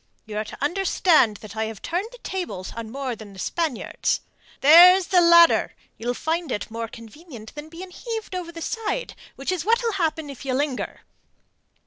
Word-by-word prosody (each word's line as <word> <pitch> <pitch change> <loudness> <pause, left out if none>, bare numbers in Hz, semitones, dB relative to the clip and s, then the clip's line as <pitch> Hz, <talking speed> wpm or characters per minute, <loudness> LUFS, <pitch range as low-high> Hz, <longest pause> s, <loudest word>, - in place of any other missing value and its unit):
You 215 -2 -8
are - - -1
to - - -9
understand 320 - +3
that 215 +1 -10
I 220 0 -1
have 220 -1 -8
turned 365 +6 -2
the - - -12
tables 270 - -5
on 230 -1 -6
more 265 0 -4
than 210 -2 -12
the - - -14
Spaniards. 310 - -2 0.4
There's 355 +6 +8
the 360 -2 +5
ladder. 340 0 +6 0.2
You'll 245 +2 -2
find 325 0 -2
it 210 - -4
more 230 0 -4
convenient 230 +1 -12
than 295 +2 -9
being 360 +3 -9
heaved 445 +1 -6
over 360 -2 -4
the 335 -1 -7
side, 455 +5 -3 0.2
which 275 +6 -3
is 360 -3 -2
what'll 460 +3 +2
happen 320 -6 -2
if 270 - -11
you 260 -2 -1
linger." 280 -1 -2
315 Hz, 180 wpm, -24 LUFS, 230-360 Hz, 0.4 s, There's